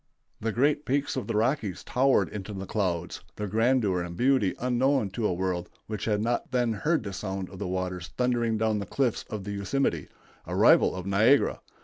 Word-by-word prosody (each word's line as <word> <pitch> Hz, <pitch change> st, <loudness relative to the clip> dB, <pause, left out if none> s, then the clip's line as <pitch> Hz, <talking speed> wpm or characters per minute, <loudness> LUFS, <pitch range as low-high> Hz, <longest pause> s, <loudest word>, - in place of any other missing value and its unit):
The 115 Hz, +1 st, -1 dB
great 145 Hz, +6 st, +2 dB
peaks 140 Hz, +1 st, 0 dB
of 130 Hz, -, -3 dB
the -, -, -2 dB
Rockies 110 Hz, -, 0 dB
towered 135 Hz, +2 st, +2 dB
into 105 Hz, 0 st, -6 dB
the 95 Hz, 0 st, -5 dB
clouds, 90 Hz, -4 st, -2 dB
their 105 Hz, -, -3 dB
grandeur 110 Hz, -3 st, +2 dB
and 85 Hz, 0 st, -6 dB
beauty 125 Hz, -7 st, +2 dB
unknown 125 Hz, -3 st, +1 dB
to 110 Hz, +1 st, -1 dB
a -, -, 0 dB
world 90 Hz, -1 st, -2 dB, 0.2 s
which 110 Hz, -1 st, -4 dB
had 105 Hz, -2 st, +1 dB
not 120 Hz, +1 st, -1 dB
then 120 Hz, -2 st, +1 dB
heard 150 Hz, +7 st, 0 dB
the 100 Hz, -2 st, -5 dB
sound 95 Hz, -1 st, -4 dB
of 95 Hz, -, -10 dB
the 100 Hz, -, -3 dB
waters 90 Hz, -1 st, -3 dB
thundering 120 Hz, -3 st, +1 dB
down 110 Hz, -1 st, +1 dB
the 100 Hz, -, -5 dB
cliffs 130 Hz, -1 st, 0 dB
of 105 Hz, -3 st, -5 dB
the 100 Hz, -, -5 dB
Yosemite, 100 Hz, -, -1 dB, 0.4 s
a -, -, -3 dB
rival -, -, +5 dB
of 90 Hz, -1 st, -6 dB
Niagara. 110 Hz, +8 st, +3 dB
105 Hz, 200 wpm, -27 LUFS, 95-125 Hz, 0.4 s, rival